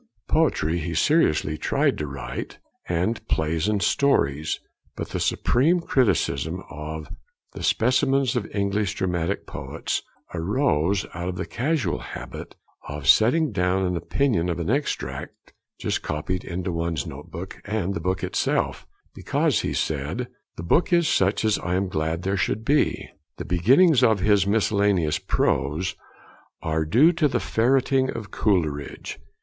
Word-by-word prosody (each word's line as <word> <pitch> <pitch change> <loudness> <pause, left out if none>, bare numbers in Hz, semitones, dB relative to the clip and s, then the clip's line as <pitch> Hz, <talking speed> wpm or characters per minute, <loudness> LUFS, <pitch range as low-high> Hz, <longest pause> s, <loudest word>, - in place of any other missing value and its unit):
Poetry 80 +3 +1
he 85 +1 -4
seriously 80 - +2
tried - - +1
to 75 - -2
write, 65 -3 -6 0.3
and 90 +7 0
plays 80 +3 0
and 105 -3 +1
stories; 80 - +1 0.4
but - - -5
the - - -3
supreme 160 +9 +2
criticism 95 - 0
of 75 +1 -6 0.5
the - - -8
Specimens 130 +2 +2
of 115 -4 -2
English 100 0 -1
Dramatic 90 0 -1
Poets - - -4 0.3
arose 95 - +1
out 85 +2 -4
of 90 - -4
the - - -3
casual 140 +4 -1
habit - - -8 0.3
of 70 -1 -6
setting 130 - +5
down 90 0 +1
an 90 0 -1
opinion 90 -2 0
of 85 0 -2
an 85 +5 -1
extract 140 +3 -3 0.3
just - - -1
copied 90 +5 -3
into 90 +1 -3
one's 85 0 -2
note 75 -2 -9
book, 95 +3 -8
and 105 -3 -2
the 85 - -3
book 95 +3 -1
itself, - - -1 0.3
because, - - 0
he - - -2
said, - - -2 0.3
'the 85 - -5
book 160 - +2
is 170 -2 +4
such 95 +3 +2
as 110 - +2
I 90 +1 -2
am 95 +1 0
glad 80 0 -2
there 95 +1 0
should 105 +5 -1
be.' 145 +3 +1 0.3
The - - -5
beginnings 130 - +4
of 110 -5 +4
his 100 -1 +3
miscellaneous 100 -6 +2
prose 80 +7 0 0.7
are 80 -1 0
due 130 - +5
to 165 -3 +2
the - - 0
'ferreting' 130 +2 +2
of 105 -5 -6
Coleridge. 80 -9 -1
95 Hz, 145 wpm, -24 LUFS, 80-120 Hz, 0.7 s, setting